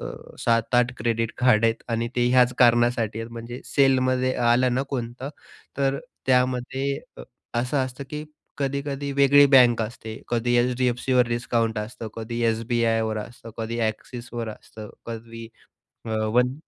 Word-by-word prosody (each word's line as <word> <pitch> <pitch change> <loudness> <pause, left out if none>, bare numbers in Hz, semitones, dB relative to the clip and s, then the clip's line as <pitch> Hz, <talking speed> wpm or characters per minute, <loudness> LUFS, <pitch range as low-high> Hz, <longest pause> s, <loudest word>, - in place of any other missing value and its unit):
अ, - - -5 0.3
7-8 120 +2 +2
credit 115 -1 -1
card 115 -3 +4
आहेत 115 0 +1
आणि 115 0 -1
ते 120 0 +3
ह्याच 125 0 +4
कारणासाठी 120 -2 +3
आहेत. 115 - -7
म्हणजे 120 +2 -7
सेलमध्ये 130 -1 +2
आलं 120 +1 +3
ना 130 - +1
कोणतं 125 +1 -4 0.5
तर 135 0 +1 0.3
त्यामध्ये 130 +2 +1 0.2
अ, - - -7 0.4
असं 130 +3 -1
असतं, 130 +2 -7
की 150 0 -5 0.3
कधी-कधी 140 0 -2
वेगळी 140 +1 +6
बँक 120 -3 +6
असते. 110 0 -7
कधी 120 0 0
एच-डी-एफ-सीवर 125 0 +1
डिस्काउंट 115 -2 0
असतं. 110 +1 -6
कधी 115 +1 -5
एस-बी-आयवर 115 -1 0
असतं. 115 +2 -9
कधी 115 +1 -3
एक्सिसवर 120 +1 -6
असतं. 105 0 -11 0.2
कधी 115 0 -7 0.6
अ, - - -4
वन 120 +4 +1
120 Hz, 135 wpm, -24 LUFS, 115-130 Hz, 0.6 s, वेगळी